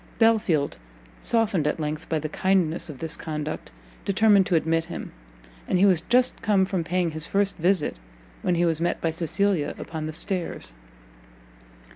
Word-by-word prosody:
Belfield, 215 Hz, -10 st, +2 dB, 0.4 s
softened 210 Hz, -9 st, +1 dB
at 150 Hz, -, -1 dB
length 150 Hz, 0 st, -4 dB
by 160 Hz, -, +1 dB
the 155 Hz, 0 st, -2 dB
kindness 175 Hz, -1 st, +1 dB
of 145 Hz, -, -7 dB
this 160 Hz, +3 st, -3 dB
conduct, 155 Hz, -1 st, -5 dB, 0.3 s
determined 200 Hz, -1 st, +4 dB
to 185 Hz, -, +2 dB
admit 165 Hz, 0 st, +1 dB
him; 175 Hz, -, -7 dB, 0.6 s
and -, -, +2 dB
he 190 Hz, -, +5 dB
was 185 Hz, -5 st, +4 dB
just 250 Hz, +6 st, +2 dB
come 200 Hz, -3 st, +3 dB
from 185 Hz, -3 st, -1 dB
paying 175 Hz, 0 st, 0 dB
his 155 Hz, 0 st, -1 dB
first 200 Hz, 0 st, +1 dB
visit, 180 Hz, -, +1 dB, 0.4 s
when 180 Hz, -, +1 dB
he 175 Hz, +1 st, +2 dB
was 165 Hz, -1 st, 0 dB
met 175 Hz, -, 0 dB
by 165 Hz, -, 0 dB
Cecilia 170 Hz, 0 st, 0 dB
upon 160 Hz, -1 st, -5 dB
the 155 Hz, -, -5 dB
stairs. 180 Hz, -, -3 dB
175 Hz, 165 wpm, -25 LUFS, 155-195 Hz, 0.6 s, he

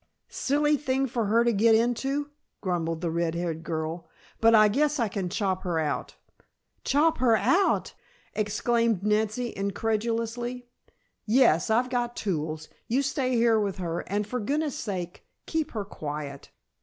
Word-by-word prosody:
"Silly 295 Hz, +2 st, +1 dB
thing 265 Hz, -1 st, 0 dB
for 235 Hz, -3 st, -1 dB
her 230 Hz, +3 st, +4 dB
to 235 Hz, 0 st, +2 dB
get 220 Hz, +2 st, +5 dB
into," 270 Hz, +5 st, 0 dB, 0.3 s
grumbled 165 Hz, -3 st, -2 dB
the 170 Hz, -2 st, -1 dB
red 170 Hz, 0 st, -1 dB
haired 170 Hz, -2 st, -3 dB
girl. 165 Hz, +1 st, -4 dB, 0.3 s
"But 225 Hz, 0 st, +6 dB
I 215 Hz, -1 st, +7 dB
guess 295 Hz, +7 st, +1 dB
I 230 Hz, -, +2 dB
can 195 Hz, -3 st, -3 dB
chop 190 Hz, -1 st, -1 dB
her 175 Hz, -3 st, -2 dB
out." 150 Hz, -2 st, -2 dB, 0.7 s
"Chop 305 Hz, +2 st, +2 dB
her 235 Hz, -3 st, +4 dB
out!" 380 Hz, -, +2 dB, 0.4 s
exclaimed 220 Hz, 0 st, +1 dB
Nancy, 215 Hz, +3 st, 0 dB
incredulously. 230 Hz, +4 st, -2 dB, 0.6 s
"Yes. 225 Hz, -8 st, +4 dB
I've 245 Hz, +3 st, +2 dB
got 240 Hz, -1 st, -1 dB
tools. 155 Hz, -5 st, -3 dB, 0.2 s
You 260 Hz, +5 st, +1 dB
stay 260 Hz, -2 st, 0 dB
here 230 Hz, -1 st, +4 dB
with 200 Hz, -2 st, -1 dB
her, 170 Hz, -2 st, -3 dB
and 205 Hz, +2 st, 0 dB
for 250 Hz, +4 st, -3 dB
goodness' 290 Hz, +6 st, -1 dB
sake 180 Hz, -5 st, -5 dB, 0.2 s
keep 315 Hz, -1 st, -1 dB
her 210 Hz, -3 st, -3 dB
quiet. 150 Hz, -5 st, -6 dB
220 Hz, 150 wpm, -27 LUFS, 180-250 Hz, 0.7 s, I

